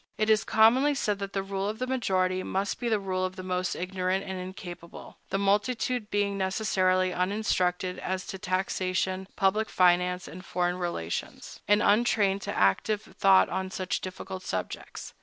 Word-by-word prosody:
It 215 0 +2
is 215 - +4
commonly 255 +7 +4
said 210 -6 -1
that 200 0 -5
the 195 - -1
rule 195 +1 -2
of 215 - -4
the 255 - -2
majority 185 -8 0
must 195 +2 -2
be 240 -1 -1
the 220 - +3
rule 185 -1 -2
of 185 0 -2
the 185 - -7
most 185 -1 -1
ignorant 185 +1 -1
and 190 - -4
incapable, 180 -2 -9
the - - 0
multitude 210 +3 0
being 200 -1 0
necessarily 185 -2 +1
uninstructed 180 -1 0
as 185 0 -3
to 190 - -7
taxation, 185 0 -1
public 210 +2 +1
finance, 180 0 +2
and 185 - -9
foreign 180 -1 -1
relations, 130 - -4
and 205 0 +4
untrained 205 -2 +3
to - - -4
active 205 - +2 0.2
thought 195 -1 +6
on 190 0 -2
such 185 -1 -3
difficult 185 0 -6
subjects. 95 - -5
190 Hz, 165 wpm, -28 LUFS, 185-205 Hz, 0.2 s, thought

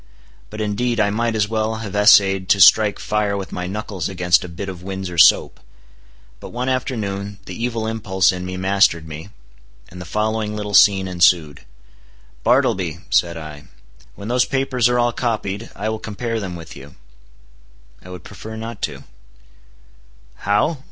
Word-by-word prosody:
But 105 +1 -7
indeed 115 +3 -1
I 100 -1 +2
might 115 +2 -1
as 105 -1 +1
well 110 0 -1
have 110 -3 -6
essayed 95 -2 +5
to 100 - +4
strike 100 +3 +6
fire 105 -1 -1
with 95 -1 -6
my 90 0 -4
knuckles 100 -3 -4
against 90 -2 +2
a 90 - -8
bit 90 +4 -7
of 90 -2 -7
Windsor 95 -2 -5
soap. - - +5 0.8
But - - -10
one 125 +2 -3
afternoon 100 -6 -3
the 95 - -8
evil 115 -2 -2
impulse 100 -6 +1
in 90 -1 -6
me 90 0 -5
mastered 95 -4 +2
me, 80 +4 -9 0.6
and 90 +1 -10
the - - -8
following 105 +3 -2
little 105 -1 -5
scene 95 +2 +5
ensued: 85 -6 +2 0.8
"Bartleby," 85 -2 +1
said 85 -1 +2
I, 75 -2 -9 0.5
"when 100 - -9
those 125 +1 +2
papers 130 -3 0
are 125 - +1
all 120 -1 +1
copied, 110 -3 -3
I 105 - -4
will 110 0 -3
compare 115 +2 -4
them 95 -4 -5
with 80 -1 -10
you." 70 +2 -13 1.1
"I 90 - -13
would 90 -2 -9
prefer 110 +2 -10
not 115 +1 -7
to." - - -4 1.3
"How? 105 - 0
100 Hz, 165 wpm, -20 LUFS, 90-110 Hz, 1.3 s, strike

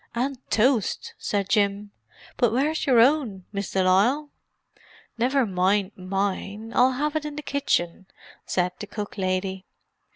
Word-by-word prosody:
"And 260 +2 -1
toast!" 230 -2 +1
said 200 -2 -1
Jim. 205 -1 +1 0.4
"But 240 -3 +2
where's 290 +7 0
your 250 -4 +5
own, 235 -8 +3
Miss 200 -2 -4
de 190 - +1
Lisle?" 240 +11 +2 0.9
"Never 260 +2 +2
mind 190 +1 +1
mine—I'll 200 +6 0
have 295 +4 -1
it 310 - 0
in 300 -1 -6
the 300 - -6
kitchen," 190 -11 -1 0.4
said 180 0 0
the 210 - -6
cook 205 0 -6
lady. 190 0 -2
210 Hz, 135 wpm, -25 LUFS, 190-265 Hz, 0.9 s, your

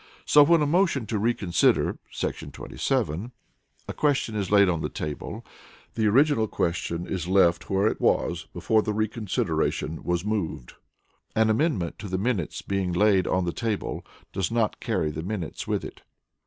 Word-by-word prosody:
(b) - - -24
So 150 - +6
when 160 +1 +5
a - - +2
motion 165 - +2
to 110 0 -2
reconsider 105 -5 +2
[§ - - -4
27] 90 +11 -2 0.6
a - - -4
question 140 -7 0
is 100 -3 -2
laid 100 -1 +6
on 85 -3 0
the - - -2
table, 75 -1 -6 0.5
the 110 -2 +1
original 130 0 +3
question 85 -2 -2
is 90 -2 -3
left 90 -2 +3
where 95 +1 +2
it - - 0
was - - +1
before 110 -1 +2
the 105 - -2
reconsideration 95 -7 -1
was 90 +1 -1
moved. 100 - -3
(c) - - -22 0.6
An 110 0 +4
amendment 110 - 0
to 105 - -6
the 95 - -1
minutes 100 -5 -2
being 95 -2 -1
laid 95 0 +3
on 90 0 +1
the 85 - -2
table 115 -3 -3 0.3
does 95 -3 -1
not 115 -3 0
carry 75 - -1
the 75 - -5
minutes 90 -1 -5
with - - -1
it. - - -10
100 Hz, 170 wpm, -26 LUFS, 90-115 Hz, 0.6 s, So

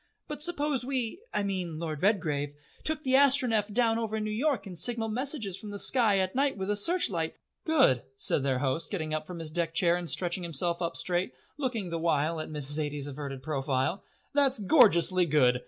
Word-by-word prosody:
But 300 -1 -6
suppose 295 -6 +1
we 255 +2 -2
I 205 - 0
mean 185 -5 -3
Lord 155 -2 -4
Redgrave 155 -8 0 0.3
took 310 -1 -2
the 260 - 0
Astronef 255 -6 +3
down 230 0 +2
over 220 -1 -2
New 215 0 -3
York 265 +4 0
and 190 -3 -8
signalled 225 +5 0
messages 245 - -2
from 210 - -8
the 205 - -6
sky 220 -2 +3
at 185 -1 0
night 275 -2 +1
with 190 +1 -2
a - - +1
searchlight 205 - +1 0.2
" - - -53
"Good," 135 - +4 0.2
said 135 - 0
their 135 -1 0
host, 135 +5 -1
getting 155 -6 -3
up 155 0 -3
from 180 - -7
his 160 -2 -6
deck 165 0 -2
chair 170 -1 +3
and 175 -2 -3
stretching 180 0 0
himself 170 +1 -1
up 170 -1 -2
straight, 180 +1 -1 0.2
looking 230 - -2
the 165 - -2
while 160 0 0
at 155 - -5
Miss 150 -3 -2
Zaidie's 145 0 -1
averted 140 -2 -6
profile. 140 +3 -1 0.3
"That's 280 -2 +3
gorgeously 185 - +5
good! 130 -5 +3
185 Hz, 200 wpm, -29 LUFS, 155-235 Hz, 0.3 s, gorgeously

